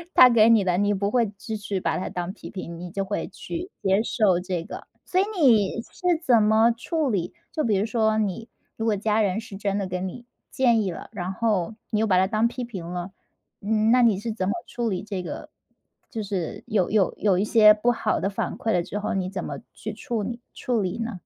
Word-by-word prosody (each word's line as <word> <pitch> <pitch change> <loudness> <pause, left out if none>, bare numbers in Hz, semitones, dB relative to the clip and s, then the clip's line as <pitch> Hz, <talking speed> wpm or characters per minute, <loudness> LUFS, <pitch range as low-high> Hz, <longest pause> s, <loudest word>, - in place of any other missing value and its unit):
它 255 - +10
给 230 -2 +5
你 225 -3 +5
的， 180 -1 +1
你 205 0 +2
不 200 0 0
会 235 -3 +3
支 220 +1 -5
持 205 -2 -3
把 - - -1
它 - - -4
当 180 +1 -4
批 - - -10
评， 170 -3 -7
你 175 0 -7
就 195 +2 -3
会 205 - -3
去 350 +3 -6
接 195 +2 +3
受 210 -6 +2
这 180 -2 -3
个。 - - -9 0.2
所 370 +1 +2
以 - - +1
你 230 - +4
是 360 -2 -1
怎 240 -7 +5
么 220 +2 +4
处 290 +3 -1
理 180 -4 -1 0.2
就 310 - -1
比 220 -3 +2
如 200 - +1
说 220 -1 +1
你 215 +2 -2 0.3
如 225 - -3
果 210 - +2
家 215 +2 +1
人 195 0 +1
是 220 -3 -9
真 200 0 -1
的 200 - -1
跟 185 +1 -3
你 240 +6 -9 0.2
建 240 -4 +3
议 195 - -1
了， - - -9
然 185 -2 -3
后 210 -1 0 0.2
你 215 - +1
又 220 - +2
把 185 -3 +3
它 185 - +4
当 215 +3 +2
批 245 +1 -5
评 210 -8 -6
了， 180 +1 -5 0.5
嗯， 215 +2 +2
那 250 +1 +5
你 225 -5 +4
是 225 +2 -3
怎 190 -4 -2
么 200 - +1
处 240 -2 -2
理 185 -3 -2
这 195 -3 -4
个 175 - -7 0.6
就 225 -6 -4
是 190 -5 -4
有 210 -6 +1
有 205 -3 +3
有 195 -4 +2
一 195 - +2
些 215 -1 +7
不 215 +3 +1
好 225 -2 0
的 195 - 0
反 195 - -3
馈 225 - -1
了 175 - +2
之 205 - -5
后， 205 - -2
你 185 -1 -1
怎 190 -2 -4
么 - - -5
去 215 - -6
处 225 0 -3
你 235 +4 -4
处 240 -4 -1
理 180 -2 -2
呢？ 230 +1 -2
210 Hz, 255 characters per minute, -25 LUFS, 190-230 Hz, 0.6 s, 它